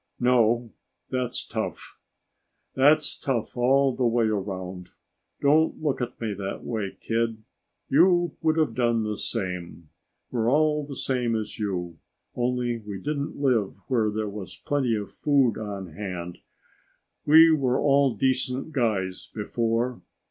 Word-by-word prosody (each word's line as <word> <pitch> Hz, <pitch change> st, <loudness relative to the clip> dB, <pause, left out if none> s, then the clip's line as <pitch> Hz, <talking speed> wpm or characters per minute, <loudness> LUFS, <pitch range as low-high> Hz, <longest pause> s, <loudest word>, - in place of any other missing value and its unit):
"No. 120 Hz, -2 st, +2 dB, 0.4 s
That's 125 Hz, -1 st, -2 dB
tough. -, -, -5 dB, 0.7 s
That's 145 Hz, +3 st, +4 dB
tough 120 Hz, -5 st, -2 dB
all 135 Hz, +2 st, +3 dB
the 130 Hz, -, -1 dB
way 115 Hz, 0 st, +2 dB
around. 95 Hz, -3 st, -3 dB, 0.5 s
Don't 155 Hz, +3 st, +3 dB
look 145 Hz, -4 st, -1 dB
at 125 Hz, 0 st, -4 dB
me 110 Hz, -3 st, -2 dB
that 95 Hz, 0 st, -5 dB
way, 110 Hz, -5 st, -4 dB
kid. 115 Hz, -1 st, -1 dB, 0.4 s
You 175 Hz, +2 st, +4 dB
would 160 Hz, 0 st, +2 dB
have 155 Hz, -1 st, +2 dB
done 120 Hz, -2 st, +1 dB
the 105 Hz, 0 st, -2 dB
same. 90 Hz, -7 st, -4 dB, 0.4 s
We're 115 Hz, -2 st, +1 dB
all 150 Hz, +1 st, +2 dB
the 140 Hz, -, -7 dB
same 125 Hz, -4 st, 0 dB
as 110 Hz, -1 st, -4 dB
you, 90 Hz, -5 st, -3 dB, 0.3 s
only 120 Hz, -1 st, -1 dB
we 105 Hz, -2 st, -7 dB
didn't 145 Hz, +7 st, -3 dB
live 125 Hz, -8 st, +1 dB
where 115 Hz, -5 st, +2 dB
there 110 Hz, 0 st, -2 dB
was 100 Hz, -2 st, -7 dB
plenty 130 Hz, -5 st, +1 dB
of 105 Hz, -1 st, -5 dB
food 135 Hz, -7 st, +2 dB
on 100 Hz, -5 st, -6 dB
hand. 90 Hz, -2 st, -6 dB, 0.9 s
We 160 Hz, +2 st, +8 dB
were 130 Hz, -4 st, +1 dB
all 140 Hz, -3 st, +3 dB
decent 130 Hz, +4 st, 0 dB
guys 105 Hz, -, -1 dB
before. 115 Hz, +3 st, -1 dB
120 Hz, 135 wpm, -26 LUFS, 105-135 Hz, 0.9 s, We